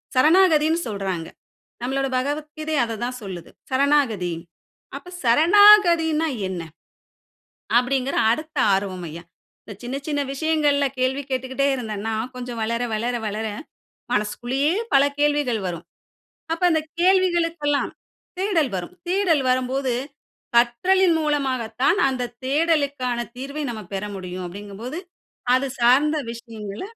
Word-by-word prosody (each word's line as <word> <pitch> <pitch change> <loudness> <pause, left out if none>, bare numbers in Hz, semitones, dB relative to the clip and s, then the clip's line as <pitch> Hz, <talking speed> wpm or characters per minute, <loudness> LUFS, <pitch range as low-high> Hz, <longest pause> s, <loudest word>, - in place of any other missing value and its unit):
சரணாகதினு 320 +2 +4
சொல்றாங்க. 190 -6 -3 0.5
நம்மளோட 270 +2 -1
பகவத்கீதை 300 +3 -3
அத 230 -1 -3
தான் 250 +1 -4
சொல்லுது. 185 -4 -8 0.2
சரணாகதி. 260 -10 +2 0.6
அப்ப 360 - -12
சரணாகதினா 330 - +6 0.2
என்ன? 180 -2 -4 1.2
அப்டிங்கற 260 +2 0 0.2
அடுத்த 310 +5 -4 0.2
ஆர்வம் 190 -2 -2
ஐயா. 165 +3 -9 0.4
இந்த 210 - -8
சின்ன 245 +2 -4
சின்ன 290 -2 0
விஷயங்களில 295 -1 +2
கேள்வி 260 +2 0
கேட்டுகிட்டே 260 +1 -1
இருந்தனா 220 -3 -4 0.2
கொஞ்சம் 245 -2 -6
வளர 230 +2 -1
வளர 235 +3 -1
வளர 215 +2 -3 0.7
மனசுக்குள்ளயே 245 +8 0 0.2
பல 275 - +7 0.2
கேள்விகள் 290 -6 +1
வரும். 170 -2 -5 0.7
அப்ப 330 - -2
அந்த 315 -1 +2 0.2
கேள்விகளுக்கெல்லாம் 345 -5 +2 0.5
தேடல் 365 -8 +1
வரும். 180 -1 -5 0.2
தேடல் 360 -6 +2
வரும்போது, 255 +1 0 0.6
கற்றலின் 335 +10 +4
மூலமாக 285 -5 0 0.2
தான் - - +4
அந்த 250 -2 -3
தேடலுக்கான 280 -4 +1 0.2
தீர்வை 280 +4 -5
நம்ம 225 -2 -5
பெற 195 0 -3
முடியும் 185 -1 -6
அப்டிங்கம்போது 205 - -7 0.6
அது 265 +2 0
சார்ந்த 275 +6 +4
விஷயங்கள 225 -3 -8
265 Hz, 110 wpm, -23 LUFS, 230-310 Hz, 1.2 s, பல